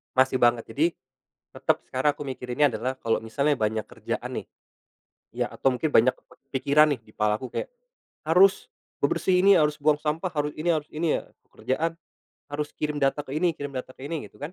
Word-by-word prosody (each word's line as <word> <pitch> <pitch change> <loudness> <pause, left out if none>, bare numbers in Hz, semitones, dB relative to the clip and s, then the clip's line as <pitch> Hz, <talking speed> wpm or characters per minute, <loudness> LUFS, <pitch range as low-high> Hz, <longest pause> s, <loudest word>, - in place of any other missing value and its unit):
Masih 130 0 +3
banget. 120 -1 +4
Jadi, 145 +8 +2 0.7
tetep - - 0
sekarang 135 +3 +1
aku 145 - -6
mikirinnya 130 +1 0
adalah 120 +4 -2
kalau 115 -3 0
misalnya 140 +6 0
banyak 110 0 0
kerjaan - - -5
nih, - - -12 0.9
ya - - -1
atau 135 - +1
mungkin 125 +5 -1
banyak 130 -2 +5 0.4
kepikiran 145 +3 +4
nih, 130 - -4
di 110 -1 -21
kepalaku 105 +4 0
kayak, - - -4 0.6
harus 190 +4 +5 0.3
bebersih 180 -1 +2
ini, 195 0 +7
harus 150 -2 +2
buang 150 +1 +4
sampah, 155 +4 -2
harus 150 -3 -2
ini, 175 - -1
harus 155 -3 +1
ini 160 +1 +1
ya, - - -4 0.3
kerjaan 165 +5 -2 0.5
harus 150 0 -4
kirim 150 -1 -2
data 140 +2 +1
ke 130 - -8
ini, 165 +1 +1
kirim 145 -1 -6
data 130 0 -5
ke 135 - -10
ini, 160 0 -4
gitu - - -23
kan. 150 +4 -6
145 Hz, 185 wpm, -26 LUFS, 130-155 Hz, 0.9 s, ini